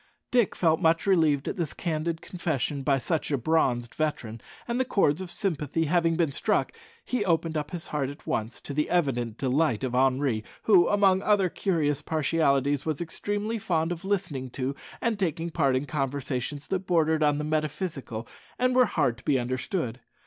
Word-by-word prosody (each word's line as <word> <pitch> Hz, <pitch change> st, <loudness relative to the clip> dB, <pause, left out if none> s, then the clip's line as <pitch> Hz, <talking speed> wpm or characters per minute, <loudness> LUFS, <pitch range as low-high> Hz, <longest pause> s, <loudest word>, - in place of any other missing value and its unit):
Dick 240 Hz, -5 st, +3 dB
felt 160 Hz, 0 st, +2 dB
much 165 Hz, -1 st, +3 dB
relieved 160 Hz, -8 st, +3 dB
at -, -, -3 dB
this 165 Hz, -5 st, -3 dB
candid 165 Hz, -1 st, -2 dB
confession 145 Hz, -6 st, -2 dB
by 135 Hz, 0 st, +2 dB
such 155 Hz, +5 st, -1 dB
a 140 Hz, -, +1 dB
bronzed 120 Hz, -4 st, +1 dB
veteran, 120 Hz, -8 st, -3 dB, 0.3 s
and, 240 Hz, +1 st, -1 dB
the -, -, +4 dB
chords 190 Hz, -, +2 dB
of 185 Hz, -, -6 dB
sympathy 165 Hz, -5 st, -1 dB
having 165 Hz, +1 st, +2 dB
been 165 Hz, -3 st, +1 dB
struck, 140 Hz, -, 0 dB, 0.3 s
he 250 Hz, -4 st, 0 dB
opened 165 Hz, -3 st, +1 dB
up 150 Hz, -1 st, -2 dB
his 175 Hz, -3 st, -5 dB
heart 140 Hz, -3 st, -2 dB
at 145 Hz, -, -11 dB
once, 110 Hz, +2 st, -2 dB
to 145 Hz, -, -6 dB
the 150 Hz, +2 st, 0 dB
evident 120 Hz, -10 st, 0 dB
delight 135 Hz, -2 st, +1 dB
of 130 Hz, -2 st, -2 dB
Henri, 130 Hz, -3 st, +2 dB, 0.2 s
who, 185 Hz, -5 st, +6 dB
among 195 Hz, -2 st, +4 dB
other 200 Hz, -3 st, +3 dB
curious 155 Hz, -7 st, 0 dB
partialities, 145 Hz, -3 st, +1 dB
was 155 Hz, -3 st, -2 dB
extremely 205 Hz, +6 st, -2 dB
fond 165 Hz, -4 st, 0 dB
of 175 Hz, 0 st, -4 dB
listening 175 Hz, -10 st, -2 dB
to 130 Hz, +2 st, -3 dB, 0.3 s
and 230 Hz, -3 st, 0 dB
taking 170 Hz, -2 st, -1 dB
part 140 Hz, -5 st, +2 dB
in 130 Hz, +3 st, 0 dB
conversations 140 Hz, -1 st, -3 dB
that 190 Hz, -1 st, -2 dB
bordered 160 Hz, -3 st, +2 dB
on 150 Hz, -1 st, +3 dB
the 150 Hz, -, -2 dB
metaphysical, 150 Hz, -6 st, -3 dB, 0.3 s
and 255 Hz, 0 st, +2 dB
were 255 Hz, -1 st, +6 dB
hard 135 Hz, -, 0 dB
to -, -, -18 dB
be 145 Hz, -3 st, +2 dB
understood. 125 Hz, -, -2 dB
155 Hz, 180 wpm, -27 LUFS, 135-175 Hz, 0.3 s, who